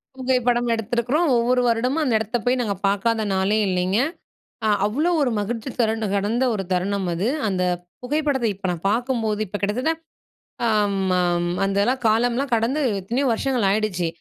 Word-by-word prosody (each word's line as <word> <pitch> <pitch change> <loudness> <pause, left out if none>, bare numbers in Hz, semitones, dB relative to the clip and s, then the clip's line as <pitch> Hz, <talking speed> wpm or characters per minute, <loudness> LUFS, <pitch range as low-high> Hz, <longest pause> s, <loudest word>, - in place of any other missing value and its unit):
புகைப்படம் 250 -2 +1
எடுத்திருக்கிறோம். 240 +8 0
ஒவ்வொரு 250 +2 +2
வருடமும் 250 +6 +1
அந்த 255 - +1
எடத்த 220 +2 -1
போயி 250 +1 +3
நாங்க 210 -4 -1
பாக்காத 215 +3 +1
நாளே 190 +3 +1
இல்லைங்க. 185 +2 +1 0.7
ஆ - - +3 0.2
அவ்ளோ 295 +12 0
ஒரு 265 - +1
மகிழ்ச்சி 225 +5 -4
தரகண்ட 220 -1 +1
கடந்த 210 +6 +1
ஒரு 195 -2 -3
தருணம் 190 +2 0
அது. 175 +5 -1 0.2
அந்த 185 -2 -1 0.4
புகைப்படத்த 285 -1 0
இப்ப 195 0 -5
நான் 175 0 -5
பாக்கும்போது 225 -2 -1
இப்போ 205 +2 -5
கிட்டத்தட்ட 245 +10 +1 0.8
அம் 210 -3 +1 0.2
அம் 175 -1 +1
அந்தலாம் 200 +7 +1
காலம்லாம் 245 +5 +1
கடந்து 230 +6 0 0.2
எத்தனையோ 240 +9 -1
வருஷங்கள் 245 -3 0
ஆயிடுச்சு. 195 -4 0
225 Hz, 150 wpm, -22 LUFS, 200-250 Hz, 0.8 s, போயி